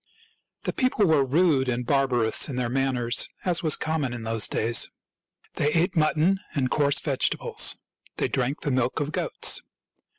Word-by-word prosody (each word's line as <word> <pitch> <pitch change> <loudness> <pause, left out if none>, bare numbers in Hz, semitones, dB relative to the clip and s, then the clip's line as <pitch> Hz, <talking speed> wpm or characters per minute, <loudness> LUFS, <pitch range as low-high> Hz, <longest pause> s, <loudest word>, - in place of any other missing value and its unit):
The - - -2
people 255 -5 +1
were 155 -5 +3
rude 140 -1 +2
and 125 0 -2
barbarous 125 -3 +2
in 135 - -5
their 125 -1 -2
manners, 125 -3 +1 0.2
as 180 -2 +2
was 155 -3 +3
common 155 -6 -2
in 120 -2 -7
those 115 -2 0
days. 115 +2 +1 0.7
They 145 - +1
ate 175 +3 +1
mutton 160 +4 +2 0.2
and 130 -3 0
coarse 140 -1 +2
vegetables. 140 -3 0 0.4
They - - 0
drank 130 +2 -2
the 145 - -2
milk 130 -1 0
of 145 +1 -3
goats. - - 0
135 Hz, 160 wpm, -25 LUFS, 125-155 Hz, 0.7 s, were